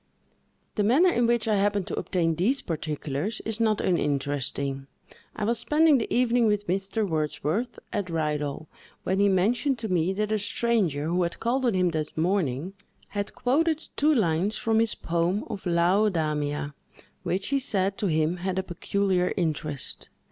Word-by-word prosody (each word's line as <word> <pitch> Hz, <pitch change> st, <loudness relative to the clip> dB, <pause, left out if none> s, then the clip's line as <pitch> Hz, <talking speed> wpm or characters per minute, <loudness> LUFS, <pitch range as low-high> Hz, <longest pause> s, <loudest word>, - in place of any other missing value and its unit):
The 210 Hz, -, 0 dB
manner 290 Hz, -, +5 dB
in 240 Hz, -5 st, +2 dB
which 235 Hz, -1 st, +1 dB
I 215 Hz, -2 st, +2 dB
happened 200 Hz, -1 st, +1 dB
to -, -, -4 dB
obtain 170 Hz, -3 st, 0 dB
these 225 Hz, -, 0 dB
particulars 155 Hz, +4 st, -3 dB
is 225 Hz, 0 st, -1 dB
not 220 Hz, -2 st, +2 dB
uninteresting. 140 Hz, -3 st, -1 dB, 0.5 s
I 215 Hz, -, -4 dB
was 230 Hz, +2 st, 0 dB
spending 300 Hz, +3 st, +4 dB
the 225 Hz, -, -4 dB
evening 245 Hz, -1 st, +3 dB
with 210 Hz, -1 st, +1 dB
Mr. 195 Hz, +4 st, -1 dB
Wordsworth, 155 Hz, -, -2 dB, 0.2 s
at 200 Hz, -4 st, -2 dB
Ridal, 150 Hz, -2 st, -2 dB, 0.4 s
when 190 Hz, +1 st, 0 dB
he 200 Hz, 0 st, +4 dB
mentioned 240 Hz, +9 st, +2 dB
to 220 Hz, -2 st, -4 dB
me 180 Hz, 0 st, +1 dB
that 210 Hz, +2 st, -2 dB
a 215 Hz, -, +1 dB
stranger, 205 Hz, -8 st, +1 dB
who 175 Hz, +3 st, 0 dB
had 170 Hz, -1 st, -2 dB
called 255 Hz, +2 st, 0 dB
on 225 Hz, -, +1 dB
him 180 Hz, -1 st, +3 dB
that 155 Hz, -1 st, -4 dB
morning, 170 Hz, -2 st, 0 dB, 0.4 s
had 205 Hz, 0 st, -4 dB
quoted 315 Hz, +5 st, +1 dB
two 300 Hz, +2 st, +3 dB
lines 195 Hz, -, +1 dB
from 225 Hz, -1 st, +1 dB
his 225 Hz, -1 st, +2 dB
poem 170 Hz, +4 st, -1 dB
of 205 Hz, -3 st, -6 dB
"Laodamia," 165 Hz, -5 st, +1 dB, 0.5 s
which, 190 Hz, +2 st, -2 dB
he 280 Hz, 0 st, +2 dB
said, 195 Hz, -6 st, 0 dB
to 210 Hz, -, 0 dB
him 160 Hz, +1 st, +1 dB
had 185 Hz, +1 st, -3 dB
a 190 Hz, -, 0 dB
peculiar 185 Hz, 0 st, 0 dB
interest. 155 Hz, -5 st, -3 dB
190 Hz, 165 wpm, -26 LUFS, 160-225 Hz, 0.5 s, manner